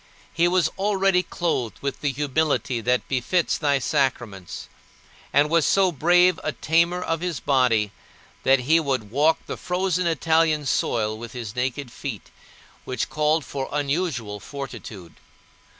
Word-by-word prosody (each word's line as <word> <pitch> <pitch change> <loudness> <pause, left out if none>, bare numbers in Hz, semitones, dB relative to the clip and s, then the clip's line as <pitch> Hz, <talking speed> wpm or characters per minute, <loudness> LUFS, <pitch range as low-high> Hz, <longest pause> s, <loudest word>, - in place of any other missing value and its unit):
He 170 +1 +3
was 175 -2 +3
already 195 -2 +2
clothed 165 - -2
with 140 -1 -4
the 145 -1 0
humility 140 -3 0
that 125 +2 0
befits 140 +7 0
thy 145 -2 +2
sacraments, 125 - -2 0.6
and 145 +1 +4
was 165 +1 +3
so 190 +2 +3
brave 175 +3 +4
a 155 - -2
tamer 170 +7 +1
of 165 0 -2
his 175 -4 -2
body 120 -7 +2 0.5
that 135 -1 +4
he 160 +6 +4
would 130 -9 -2
walk 150 +5 +2
the - - -5
frozen 180 -1 -1
Italian 160 -1 +2
soil 110 -4 0
with 115 +1 -9
his 115 -3 -6
naked 125 +1 -2
feet, 125 -6 -7 0.5
which 130 - -3
called 155 0 +1
for 135 -1 -4
unusual 145 - -2
fortitude. 110 - -8
145 Hz, 140 wpm, -24 LUFS, 125-165 Hz, 0.6 s, and